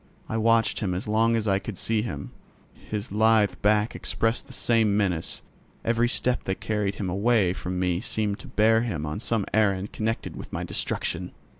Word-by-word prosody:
I -, -, -3 dB
watched 115 Hz, 0 st, +3 dB
him 95 Hz, -4 st, -1 dB
as 90 Hz, -, -4 dB
long 115 Hz, +2 st, +3 dB
as 110 Hz, -1 st, -1 dB
I 95 Hz, -1 st, +3 dB
could 100 Hz, -1 st, -7 dB
see 110 Hz, +3 st, 0 dB
him. 75 Hz, -11 st, -5 dB, 0.4 s
His 105 Hz, +1 st, -6 dB
lithe 110 Hz, -1 st, +4 dB
back 105 Hz, +2 st, +3 dB
expressed 115 Hz, +1 st, -1 dB
the -, -, -13 dB
same 110 Hz, -3 st, +2 dB
menace; 90 Hz, -5 st, 0 dB, 0.4 s
every 115 Hz, +1 st, +2 dB
step 125 Hz, 0 st, +1 dB
that 95 Hz, -, -2 dB
carried 105 Hz, -2 st, -1 dB
him 100 Hz, -, -3 dB
away 100 Hz, 0 st, +2 dB
from 90 Hz, -1 st, -4 dB
me 90 Hz, -1 st, 0 dB
seemed 105 Hz, -3 st, -1 dB
to 135 Hz, -, -11 dB
bear 110 Hz, -2 st, +3 dB
him 95 Hz, -11 st, -2 dB
on 75 Hz, +5 st, -3 dB
some 110 Hz, -3 st, -1 dB
errand 100 Hz, -2 st, +1 dB
connected 110 Hz, +1 st, -2 dB
with -, -, -9 dB
my -, -, -3 dB
destruction. 90 Hz, +1 st, -2 dB
105 Hz, 185 wpm, -26 LUFS, 95-115 Hz, 0.4 s, lithe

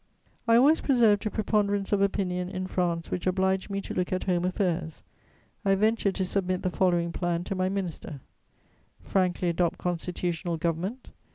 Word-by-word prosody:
I 230 Hz, -, +6 dB
always 285 Hz, +7 st, +5 dB
preserved 225 Hz, -6 st, +3 dB
a -, -, 0 dB
preponderance 205 Hz, -2 st, 0 dB
of 205 Hz, -1 st, +2 dB
opinion 180 Hz, -2 st, 0 dB
in 185 Hz, -1 st, -4 dB
France 175 Hz, -3 st, -1 dB
which 180 Hz, -, -2 dB
obliged 190 Hz, +1 st, +1 dB
me 200 Hz, 0 st, -2 dB
to -, -, -6 dB
look 180 Hz, -1 st, -1 dB
at 185 Hz, -, -1 dB
home 180 Hz, -2 st, +1 dB
affairs. 180 Hz, -3 st, -1 dB, 0.6 s
I 195 Hz, -1 st, +3 dB
ventured 215 Hz, -1 st, +1 dB
to 190 Hz, -, 0 dB
submit 185 Hz, -1 st, -1 dB
the 185 Hz, -, 0 dB
following 175 Hz, -2 st, +1 dB
plan 175 Hz, -1 st, -1 dB
to 195 Hz, -, -3 dB
my 185 Hz, 0 st, 0 dB
minister: 180 Hz, -7 st, -4 dB, 0.8 s
"Frankly 185 Hz, -2 st, 0 dB
adopt 170 Hz, +1 st, +1 dB
constitutional 175 Hz, -1 st, -2 dB
government. 175 Hz, +10 st, -3 dB
185 Hz, 165 wpm, -27 LUFS, 175-200 Hz, 0.8 s, I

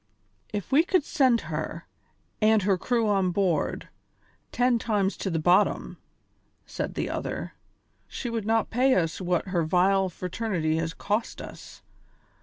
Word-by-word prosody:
"If 205 Hz, -3 st, -5 dB
we 290 Hz, +4 st, +5 dB
could 365 Hz, -2 st, +2 dB
send 255 Hz, -5 st, +2 dB
her, -, -, -5 dB, 0.6 s
with 215 Hz, -1 st, +4 dB
her 195 Hz, 0 st, +3 dB
crew 230 Hz, +4 st, 0 dB
on 195 Hz, -3 st, +2 dB
board, 180 Hz, -2 st, 0 dB, 0.6 s
ten 245 Hz, -1 st, +2 dB
times 205 Hz, -4 st, 0 dB
to 195 Hz, -, -3 dB
the 165 Hz, -, -1 dB
bottom," 175 Hz, +6 st, +2 dB, 0.7 s
said -, -, -5 dB
the -, -, -2 dB
other, -, -, -4 dB, 0.5 s
"she -, -, -6 dB
would 225 Hz, -3 st, -3 dB
not 225 Hz, 0 st, +1 dB
pay 255 Hz, +3 st, +3 dB
us 165 Hz, 0 st, 0 dB
what 180 Hz, +1 st, -1 dB
her 180 Hz, -2 st, +1 dB
vile 185 Hz, +3 st, +2 dB
fraternity 180 Hz, -3 st, -2 dB
has 165 Hz, +1 st, -2 dB
cost 215 Hz, +3 st, -2 dB
us. -, -, -11 dB
200 Hz, 145 wpm, -26 LUFS, 180-230 Hz, 0.7 s, we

